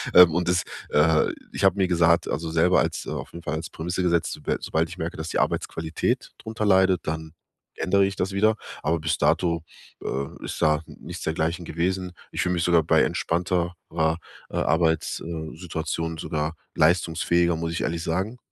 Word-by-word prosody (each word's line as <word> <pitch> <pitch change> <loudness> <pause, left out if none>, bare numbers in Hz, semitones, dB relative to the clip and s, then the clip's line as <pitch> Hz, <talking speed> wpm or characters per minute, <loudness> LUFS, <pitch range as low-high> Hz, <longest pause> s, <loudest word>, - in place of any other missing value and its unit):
Ähm, 90 -3 +9
und 85 +1 0
das, 90 -1 +3 0.3
äh 75 +1 +4 0.2
ich - - -4
habe 95 0 +5
mir 95 -2 +3
gesagt, 85 -1 +4
also, 80 +1 -2
selber 85 +3 +4
als - - -1
auf - - -5
jeden 85 0 -9
Fall 75 - -2
als 80 +1 -5
Prämisse 90 +3 -3
gesetzt, 85 -2 +1
soba 75 - -2
sobald 80 +1 0
ich 85 - -9
merke, 85 0 -4
dass 80 +2 -4
die - - -1
Arbeitsqualität 80 0 -1
drunter 110 -1 -5
leidet, 95 -3 +4
dann 80 0 -4 0.4
ändere 100 +1 +3
ich 100 0 -2
das 95 +2 -1
wieder. 110 +3 +3 0.3
Aber 80 +1 +1
bis 80 - 0
dato, 85 -2 +2 0.4
äh, 70 +1 -4
ist - - -5
da 75 0 +3
nichts - - -9
dergleichen 80 +2 -1
gewesen. 90 +2 -2 0.2
Ich - - -2
fühle 90 - +1
mich 85 -1 0
sogar 85 -2 +4
bei - - +4
entspannter 90 +1 0 0.2
ra 80 0 +1 0.3
äh, - - -8
Arbeits, 80 -1 +1
äh, 80 -2 -5
Situation 80 -1 -3
sogar 80 +1 -2 0.2
leistungsfähiger, 85 +1 +3
muss 85 0 -3
ich - - -2
ehrlich 85 0 -1
sagen. 95 +8 -2
85 Hz, 185 wpm, -25 LUFS, 80-90 Hz, 0.4 s, Ähm